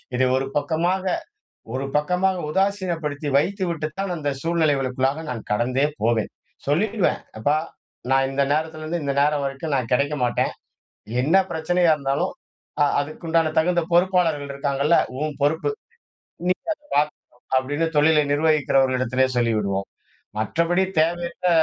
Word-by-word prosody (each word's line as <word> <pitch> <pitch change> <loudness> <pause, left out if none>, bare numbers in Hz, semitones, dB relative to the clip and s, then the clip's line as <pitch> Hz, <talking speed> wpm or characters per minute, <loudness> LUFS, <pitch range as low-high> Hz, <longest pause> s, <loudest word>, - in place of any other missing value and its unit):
இதை 130 +1 +3
ஒரு 135 - -1
பக்கமாக 165 +6 0 0.7
ஒரு 135 +1 -2
பக்கமாக 180 +4 +1
உதாசீனப்படுத்தி 170 -6 -1
வைத்துவிட்டு 170 -2 -1
தான், 195 -2 -1
அந்த 145 -2 -2
சூழ்நிலைகளுக்குள்ளாக 145 -3 +1
நான் 115 -3 -6
கடந்தே 125 +6 +1 0.2
போவேன். 115 -1 +1 0.4
சொல்லிடுவேன். 195 +7 +1 0.2
அப்பா! 145 +7 +2 0.5
நான் 135 0 +4
இந்த 135 +1 0
நேரத்துலேருந்து 160 +2 -2
இந்த 140 -1 -1
நேரம் 150 0 +2
வரைக்கும் 140 +2 -3
நான் 125 -3 -2
கிடைக்க 140 +4 +1
மாட்டேன். 120 - 0 0.7
என்ன 160 +8 +4
பிரச்சனையா 175 +2 +2
இருந்தாலும், 140 -1 -1 0.5
அ - - +7 0.2
அதுக்குண்டான 160 +2 0
தகுந்த 175 +1 +2
பொறுப்பாளர்கள் 170 -5 +2
இருக்காங்கல்ல, 140 +3 +1 0.2
உன் 155 -1 -1
பொறுப்பு. 155 - +1 0.7
இன்னைக்கி 180 +1 -1
அத - - -56 0.2
பார்த்துக்கணும் 145 -4 -3
அப்பிடின்னு 145 +5 0
தொழிலை 150 0 +5
நிர்வகிக்கிறவர்கள் 145 -4 +2
இடத்திலே 130 +1 +2
சொல்லிவிடுவோம். 105 -5 0 0.5
மற்றபடி 170 - +1 0.2
தேவையற்ற 170 +2 0
150 Hz, 120 wpm, -23 LUFS, 135-170 Hz, 0.7 s, அ